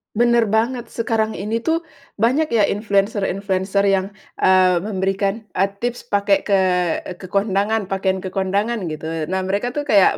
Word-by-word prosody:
Bener 235 Hz, 0 st, +3 dB
banget, 230 Hz, +2 st, 0 dB
sekarang 225 Hz, -1 st, -1 dB
ini 215 Hz, +4 st, -2 dB
tuh, 330 Hz, +3 st, 0 dB, 0.3 s
banyak 255 Hz, +9 st, +2 dB
ya 225 Hz, -3 st, +3 dB
influenser-influenser 200 Hz, -1 st, 0 dB
yang, 195 Hz, -1 st, +2 dB, 0.4 s
eee, 185 Hz, -1 st, +5 dB
memberikan, 195 Hz, +2 st, -1 dB
eee, 195 Hz, +2 st, +1 dB
tips 245 Hz, 0 st, -3 dB
pakai 200 Hz, -1 st, +2 dB
ke 200 Hz, -2 st, +3 dB, 0.6 s
ke 185 Hz, -, -8 dB
kondangan 200 Hz, +2 st, 0 dB
pakaian 190 Hz, 0 st, 0 dB
ke 185 Hz, -, -5 dB
kondangan, 200 Hz, +1 st, -1 dB
gitu. 155 Hz, 0 st, -6 dB, 0.2 s
Nah, 190 Hz, 0 st, -1 dB
mereka 200 Hz, +6 st, -1 dB
tuh 295 Hz, -, -1 dB
kayak, 205 Hz, -8 st, +4 dB
200 Hz, 145 wpm, -20 LUFS, 190-225 Hz, 0.6 s, eee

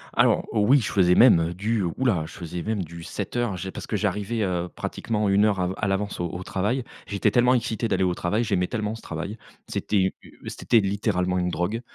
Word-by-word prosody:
Alors -, -, +4 dB
oui, 115 Hz, +6 st, +4 dB
je -, -, -3 dB
faisais 90 Hz, -3 st, +4 dB
même 85 Hz, -8 st, +5 dB
du 105 Hz, +3 st, -1 dB
ouh 85 Hz, +10 st, -2 dB
là, 90 Hz, -11 st, +2 dB
je 85 Hz, -, -12 dB
faisais 85 Hz, 0 st, -6 dB
même 105 Hz, -4 st, -2 dB
du 85 Hz, +1 st, -10 dB
7:00, 105 Hz, +2 st, -3 dB
j'ai 95 Hz, +2 st, -5 dB
parce -, -, -8 dB
que -, -, -1 dB
j'arrivais, 105 Hz, +2 st, -1 dB
heu, 90 Hz, -2 st, -1 dB
pratiquement 105 Hz, +1 st, -2 dB
1 100 Hz, +2 st, +4 dB
heure 100 Hz, -3 st, +1 dB
av 90 Hz, +1 st, -1 dB
à 105 Hz, -, -1 dB
l'avance 100 Hz, -1 st, -2 dB
au 85 Hz, -, 0 dB
au 90 Hz, +3 st, -6 dB
travail. 105 Hz, +8 st, -1 dB, 0.2 s
J'étais 100 Hz, -1 st, +1 dB
tellement 125 Hz, +1 st, +4 dB
excité 115 Hz, -1 st, -1 dB
d'aller 95 Hz, -, +1 dB
au 90 Hz, -1 st, +1 dB
travail, 105 Hz, +8 st, 0 dB
j'aimais 95 Hz, -4 st, +1 dB
tellement 105 Hz, +1 st, -3 dB
ce 115 Hz, -, -9 dB
travail. 85 Hz, +7 st, -6 dB, 0.3 s
C'était 105 Hz, -, -2 dB
u 95 Hz, -1 st, +3 dB, 0.4 s
c'était 115 Hz, -, +2 dB
littéralement 95 Hz, -2 st, 0 dB
une 90 Hz, 0 st, 0 dB
drogue, 90 Hz, +6 st, -1 dB
100 Hz, 215 wpm, -25 LUFS, 90-110 Hz, 0.4 s, même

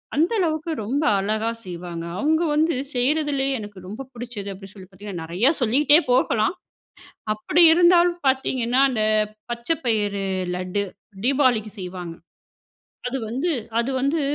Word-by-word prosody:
அந்த 320 Hz, +8 st, +2 dB
அளவுக்கு 320 Hz, -1 st, -1 dB
ரொம்ப 280 Hz, +7 st, -1 dB, 0.2 s
அழகா 215 Hz, +3 st, -1 dB, 0.2 s
செய்வாங்க. 175 Hz, -2 st, -6 dB
அவுங்க 315 Hz, +2 st, +2 dB
வந்து 320 Hz, +2 st, +2 dB, 0.2 s
செய்றதிலேயே 275 Hz, +1 st, +1 dB
எனக்கு 205 Hz, -2 st, -9 dB
ரொம்ப 220 Hz, +8 st, -7 dB
புடிச்சது, 235 Hz, -4 st, -7 dB
அப்டி 195 Hz, 0 st, -11 dB
சொல்லி 190 Hz, -2 st, -12 dB
பாத்தீங்கன்னா, 190 Hz, -3 st, -8 dB
நெறையா 185 Hz, -, +2 dB
சொல்லிகிட்டே 290 Hz, +7 st, +5 dB
போகலாம். 235 Hz, +3 st, +2 dB, 0.8 s
அப்படி 300 Hz, +11 st, +2 dB
இருந்தாலும் 345 Hz, 0 st, +4 dB
பாத்தீங்கன்னா, 260 Hz, -2 st, 0 dB
அந்த 220 Hz, -4 st, -1 dB, 0.5 s
பச்ச 235 Hz, 0 st, -5 dB, 0.2 s
பயிறு 205 Hz, -3 st, 0 dB, 0.3 s
லட்டு, 185 Hz, +3 st, -2 dB, 0.4 s
தீபாவளிக்கு 250 Hz, -6 st, +2 dB
செய்வாங்க. 180 Hz, -2 st, -6 dB, 0.9 s
அது 265 Hz, -, -3 dB
வந்து 270 Hz, +10 st, -1 dB, 0.3 s
அது 235 Hz, +3 st, 0 dB
வந்து 280 Hz, +5 st, 0 dB
240 Hz, 125 wpm, -23 LUFS, 200-290 Hz, 0.9 s, சொல்லிகிட்டே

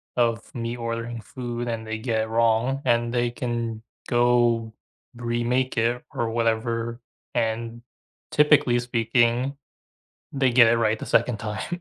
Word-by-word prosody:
of 115 Hz, -2 st, 0 dB
me 115 Hz, 0 st, -3 dB
ordering 115 Hz, 0 st, -4 dB
food 120 Hz, +2 st, -5 dB
and 115 Hz, -1 st, -3 dB
they 110 Hz, 0 st, -3 dB
get 110 Hz, -1 st, -1 dB
it -, -, -5 dB
wrong, 115 Hz, +4 st, +2 dB
and 120 Hz, -1 st, +2 dB
they 120 Hz, -1 st, +1 dB
can 115 Hz, -2 st, -3 dB, 0.3 s
go 120 Hz, -2 st, +2 dB, 0.4 s
remake 120 Hz, +2 st, -1 dB
it 120 Hz, +2 st, +1 dB
or 115 Hz, -1 st, -1 dB
whatever, 115 Hz, +1 st, -1 dB, 0.3 s
and 115 Hz, 0 st, -2 dB, 0.5 s
typically 150 Hz, -5 st, +4 dB
speaking, 120 Hz, +2 st, +1 dB, 0.8 s
they 135 Hz, -2 st, +2 dB
get 120 Hz, -1 st, +7 dB
it -, -, +3 dB
right 110 Hz, -1 st, +1 dB
the -, -, -7 dB
2nd 115 Hz, -1 st, +2 dB
time. 110 Hz, -, -4 dB
120 Hz, 135 wpm, -24 LUFS, 115-120 Hz, 0.8 s, get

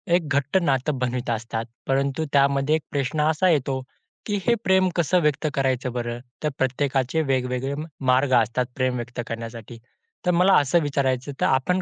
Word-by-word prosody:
एक 165 Hz, -4 st, 0 dB
घट्ट 140 Hz, +4 st, +1 dB
नातं 135 Hz, -2 st, 0 dB
बनवत 125 Hz, 0 st, -2 dB
असतात. 115 Hz, 0 st, -2 dB, 0.2 s
परंतु 140 Hz, +3 st, 0 dB
त्यामध्ये 140 Hz, +1 st, +3 dB
एक 160 Hz, -, -1 dB
प्रश्न 145 Hz, +2 st, -1 dB
असा 160 Hz, +4 st, +2 dB
येतो, 135 Hz, -4 st, +1 dB, 0.4 s
की 205 Hz, -, -1 dB
हे 235 Hz, -, +5 dB
प्रेम 190 Hz, -1 st, +3 dB
कसं 175 Hz, +1 st, +2 dB
व्यक्त 150 Hz, 0 st, +1 dB
करायचं 130 Hz, -2 st, 0 dB
बरं. 120 Hz, -1 st, -3 dB, 0.2 s
तर 150 Hz, -, +2 dB
प्रत्येकाचे 135 Hz, +2 st, 0 dB
वेगवेगळे 130 Hz, -1 st, -1 dB, 0.4 s
मार्ग 130 Hz, +1 st, +3 dB
असतात 120 Hz, +3 st, -1 dB
प्रेम 130 Hz, -2 st, 0 dB
व्यक्त 120 Hz, 0 st, -6 dB
करण्यासाठी. 115 Hz, 0 st, -7 dB, 0.5 s
तर 180 Hz, -, +3 dB
मला 180 Hz, +3 st, +4 dB
असं 145 Hz, +4 st, +2 dB
विचारायचं, 140 Hz, -2 st, -1 dB
तर -, -, +4 dB
आपण 180 Hz, +8 st, +2 dB
135 Hz, 165 wpm, -24 LUFS, 125-150 Hz, 0.5 s, हे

